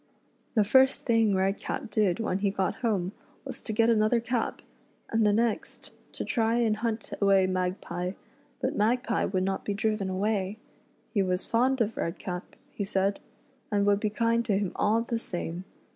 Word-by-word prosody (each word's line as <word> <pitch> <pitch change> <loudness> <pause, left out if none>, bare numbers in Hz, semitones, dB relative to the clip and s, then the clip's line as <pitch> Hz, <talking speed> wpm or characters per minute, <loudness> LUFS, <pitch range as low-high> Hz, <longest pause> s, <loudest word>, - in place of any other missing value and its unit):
The 215 - +5
first 265 +6 +4
thing 225 -4 +3
Redcap 195 +3 -1
did 205 -4 +2
when 195 -4 -1
he 200 0 +2
got 190 -1 -1
home 200 -6 0 0.3
was - - -7
to - - -4
get 225 +1 +3
another 225 +1 +3
cap, 235 0 -2 0.5
and 225 0 +2
the 210 - +4
next, 225 +1 -1 0.2
to - - -4
try 230 -4 +1
and 225 -3 +2
hunt 225 0 -3
away 195 -1 +5
Magpie; 185 -1 -2 0.5
but - - -1
Magpie 235 +2 +1
would 185 -1 0
not 195 0 -1
be 205 - -2
driven 215 -2 0
away. 195 +1 -1 0.6
He 205 - +3
was 185 -1 0
fond 255 +2 +2
of 225 0 0
Redcap, 180 +1 -4 0.2
he 205 - -3
said, 195 0 0 0.5
and 200 -1 +2
would 200 0 +3
be 215 - 0
kind 230 +2 +1
to 205 -4 +2
him 200 -3 -1
all 220 +2 +2
the 235 -1 -2
same. 175 -3 -4
210 Hz, 175 wpm, -28 LUFS, 190-230 Hz, 0.6 s, The